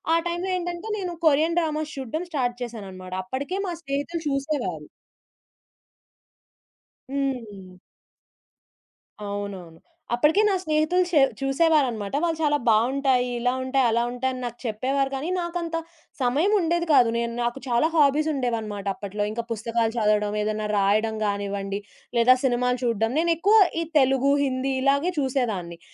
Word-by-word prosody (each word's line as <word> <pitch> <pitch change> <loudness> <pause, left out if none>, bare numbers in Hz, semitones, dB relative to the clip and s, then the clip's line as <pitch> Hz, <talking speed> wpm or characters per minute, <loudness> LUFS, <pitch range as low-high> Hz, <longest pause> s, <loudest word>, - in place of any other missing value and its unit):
ఆ - - +5
టైం‌లో 345 +2 -2
ఏంటంటే 350 +3 -5
నేను 360 -2 -4
కొరియన్ 315 +3 +3
డ్రామాస్ 310 -2 -2
చూడడం 270 +6 -4
స్టార్ట్ 245 -5 -1
చేశానన్నమాట. 190 -6 -8
అప్పడికే 280 - -3
మా 350 - -2
స్నేహితులు 290 +4 -3
చూసేవారు. 270 - -2 2.2
హ్మ్. 225 -10 -4 1.5
అవునవును. 200 -5 -6 0.3
అప్పడికే 300 - +3
నా 390 - +2
స్నేహితులు 310 +3 +2
షే 315 -5 +4 0.2
చూసేవారనమాట. 270 -7 +1
వాళ్ళు 330 -2 0
చాలా 295 -1 +3
బావుంటాయి 250 +3 +3
ఇలా 245 +1 +1
ఉంటాయి 260 0 +1
అలా 235 +1 +2
ఉంటాయి 260 +1 -1
అని 255 - -6
నాకు 240 0 -6
చెప్పేవారు 265 +5 0
కానీ 280 +6 -3
నాకంత 345 -1 -3 0.5
సమయం 280 +11 +2
ఉండేది 340 0 0
కాదు. 245 -4 +6
నేను 235 0 -2
నాకు 240 +3 -2
చాలా 240 +6 +3
హాబీస్ 300 0 +4
ఉండేవన్నమాట 225 -6 -3
అప్పట్లో. 205 +1 -4
ఇంకా 235 +1 -3
పుస్తకాలు 230 0 -1
చదవడం, 210 -1 +1
ఏదైనా 215 0 -2
రాయడం 215 +3 +2
గానివ్వండి, 200 -1 -2 0.4
లేదా 250 +2 +6
సినిమాలు 250 -1 +1
చూడడం 225 -1 +1
నేను 335 +1 +3
ఎక్కువ 410 +6 +4 0.2
ఈ - - 0 0.2
తెలుగు, 270 +1 +3
హిందీ 265 0 -1
ఇలాగే 280 +6 +2
చూసేదాన్ని. 220 -11 -2
255 Hz, 130 wpm, -24 LUFS, 220-305 Hz, 2.2 s, కాదు